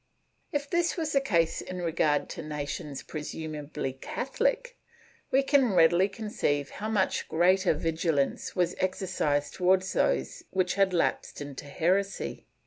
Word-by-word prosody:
If 285 Hz, -1 st, -1 dB
this 345 Hz, +3 st, +1 dB
was 320 Hz, -2 st, -1 dB
the 275 Hz, -, +3 dB
case 170 Hz, -10 st, +1 dB
in 185 Hz, 0 st, -6 dB
regard 155 Hz, -3 st, +1 dB
to -, -, -6 dB
nations 150 Hz, -1 st, -5 dB
presumably 150 Hz, -3 st, -5 dB
Catholic, -, -, -2 dB, 0.5 s
we 270 Hz, +1 st, +3 dB
can 270 Hz, -6 st, +3 dB
readily 175 Hz, +3 st, +5 dB
conceive 195 Hz, -, -2 dB
how 215 Hz, +1 st, -5 dB
much 205 Hz, -4 st, 0 dB
greater 180 Hz, +1 st, +3 dB
vigilance 160 Hz, -2 st, -1 dB
was 180 Hz, -2 st, +1 dB
exer 185 Hz, +1 st, -1 dB, 0.3 s
cised 145 Hz, 0 st, -5 dB
towards 185 Hz, +1 st, +2 dB
those 65 Hz, -1 st, 0 dB
which 185 Hz, -1 st, +1 dB
had 195 Hz, -1 st, +3 dB
lapsed 175 Hz, -2 st, 0 dB
into 145 Hz, 0 st, -7 dB
heresy. 185 Hz, +7 st, -1 dB
180 Hz, 135 wpm, -28 LUFS, 150-210 Hz, 0.5 s, readily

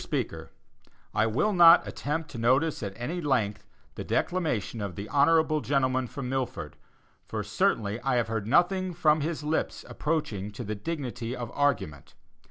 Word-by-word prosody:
SPEAKER: -, -, -3 dB, 0.6 s
I 110 Hz, +1 st, +2 dB
will 135 Hz, -, +1 dB
not 170 Hz, -1 st, +7 dB
attempt 150 Hz, +2 st, -3 dB
to 120 Hz, -, -7 dB
notice 130 Hz, +7 st, +2 dB
at 100 Hz, -3 st, -4 dB
any 160 Hz, +10 st, -4 dB
length 125 Hz, -9 st, 0 dB, 0.3 s
the -, -, -6 dB
declamation 120 Hz, -, -1 dB
of 100 Hz, -4 st, -4 dB
the 100 Hz, +3 st, -6 dB
honorable 155 Hz, +1 st, +3 dB
gentleman 130 Hz, -3 st, +1 dB
from 135 Hz, +1 st, -6 dB
Milford, 125 Hz, -, -3 dB, 0.5 s
for -, -, -3 dB
certainly 105 Hz, 0 st, 0 dB
I 135 Hz, -2 st, 0 dB
have 120 Hz, -2 st, +1 dB
heard 110 Hz, -2 st, -3 dB
nothing 180 Hz, +6 st, +2 dB
from 155 Hz, -2 st, +3 dB
his 155 Hz, 0 st, -3 dB
lips 155 Hz, +2 st, -2 dB
approaching 115 Hz, -11 st, -2 dB
to 120 Hz, -, -6 dB
the 110 Hz, -1 st, -3 dB
dignity 125 Hz, -1 st, -4 dB
of 120 Hz, -2 st, -6 dB
argument. 110 Hz, -, -1 dB
130 Hz, 160 wpm, -28 LUFS, 110-155 Hz, 0.6 s, not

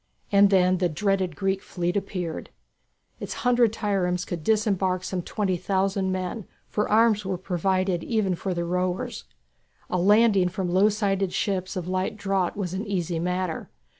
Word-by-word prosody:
And 200 Hz, 0 st, +6 dB
then 185 Hz, -1 st, +3 dB
the 180 Hz, -2 st, +2 dB
dreaded 190 Hz, 0 st, 0 dB
Greek 195 Hz, +3 st, -1 dB
fleet 175 Hz, 0 st, -3 dB
appeared. 180 Hz, -5 st, -3 dB, 0.7 s
Its -, -, -5 dB
hundred 240 Hz, -2 st, +4 dB
triremes 190 Hz, -5 st, -1 dB
could 170 Hz, -3 st, -5 dB
disembark 195 Hz, -4 st, +1 dB
some 185 Hz, -1 st, -3 dB
twenty 190 Hz, 0 st, -1 dB
thousand 190 Hz, +1 st, 0 dB
men, 185 Hz, +3 st, -4 dB, 0.2 s
for 210 Hz, -, -1 dB
arms 220 Hz, -1 st, +4 dB
were 190 Hz, -1 st, -2 dB
provided 185 Hz, 0 st, 0 dB
even 215 Hz, -5 st, 0 dB
for 180 Hz, +1 st, -3 dB
the 170 Hz, 0 st, -2 dB
rowers. 180 Hz, +7 st, -2 dB, 0.7 s
A 180 Hz, -, +1 dB
landing 205 Hz, -1 st, +4 dB
from 180 Hz, -1 st, -3 dB
low 190 Hz, +4 st, +5 dB
sided 195 Hz, -3 st, 0 dB
ships 185 Hz, -2 st, -1 dB
of 180 Hz, -2 st, -4 dB
light 185 Hz, +3 st, -1 dB
draught 195 Hz, -3 st, -1 dB
was 185 Hz, -4 st, -3 dB
an 200 Hz, +3 st, -4 dB
easy 175 Hz, -4 st, -1 dB
matter. 180 Hz, -1 st, -2 dB
190 Hz, 160 wpm, -25 LUFS, 180-200 Hz, 0.7 s, And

